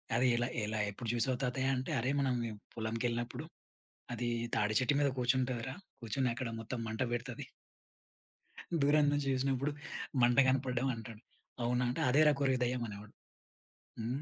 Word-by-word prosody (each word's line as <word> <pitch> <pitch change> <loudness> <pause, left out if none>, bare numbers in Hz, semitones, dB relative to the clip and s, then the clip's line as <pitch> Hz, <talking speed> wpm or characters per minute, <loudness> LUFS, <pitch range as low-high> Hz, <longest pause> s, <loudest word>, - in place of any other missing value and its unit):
అది, 125 +2 +4
ఎలా 120 0 +1 0.2
ఎలా 105 +1 -1
ఎప్పుడు 115 +4 -7
చూసావు 125 +2 +2
తాతయ్య 130 +1 +1
అంటే, 130 0 -3
"అరేయ్! 130 +4 0
మనం 130 -2 +1 0.4
పొలంకెళ్ళినప్పుడు, 115 +1 -2 0.7
అది 120 +1 -2 0.3
తాడి 105 0 +1
చెట్టు 130 +3 +2
మీద 145 - +4
కూర్చుంటదిరా, 130 0 0 0.3
కూర్చొని 125 +2 0
అక్కడ 130 -1 -3
మొత్తం 115 +2 -4
మంట 110 +2 -4
బెడతది." 125 +2 -4 1.4
దూరం 145 +1 +5
నుంచి 145 -1 0
జూసినప్పుడు 135 +2 0 0.5
మంట 120 +1 +4
కనపడ్డం 130 0 +1
అంటాడు. 115 -1 -9 0.4
అవునా! 125 +1 +1
అంటే 125 - -2
అదేరా 150 +4 +6
కోరివి 135 -2 +2
దెయ్యం 125 0 0
అనేవాడు. 105 0 -9 0.9
హ్మ్. 120 +5 -2
125 Hz, 140 wpm, -34 LUFS, 115-135 Hz, 1.4 s, అదేరా